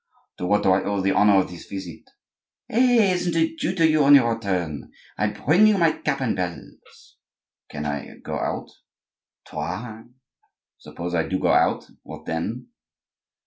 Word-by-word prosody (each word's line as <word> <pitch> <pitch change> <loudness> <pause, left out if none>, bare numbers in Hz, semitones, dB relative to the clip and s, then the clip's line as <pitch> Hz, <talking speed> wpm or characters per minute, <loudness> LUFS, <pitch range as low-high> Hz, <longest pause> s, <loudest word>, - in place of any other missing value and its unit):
"To 90 - -3
what 105 +2 +2
do 95 - +4
I 95 +1 +3
owe 100 0 -1
the 95 +1 +1
honor 105 0 +4
of 95 - 0
this 90 - -11
visit?" 95 -4 -8 0.7
"Hey! 235 -4 +3
Isn't 180 -2 -1
it 165 0 0
due 180 - -1
to 165 -3 +4
you 155 -1 +3
on 140 +1 +8
your 115 -4 +4
return? 90 -9 -3 0.2
I 105 - 0
bring 165 - +3
you 215 -2 +3
my 165 -3 +4
cap 150 - -3
and 130 - 0
bells." 90 -2 -8 0.5
"Can 75 0 -6
I 70 -1 -5
go - - -6
out?" - - -4 0.7
"Try." 110 +5 -6 0.7
"Suppose 85 +1 -7
I 80 -1 0
do 95 - -1
go - - 0
out, - - +2 0.2
what - - -11
then?" 110 - -4
105 Hz, 170 wpm, -23 LUFS, -, 0.7 s, on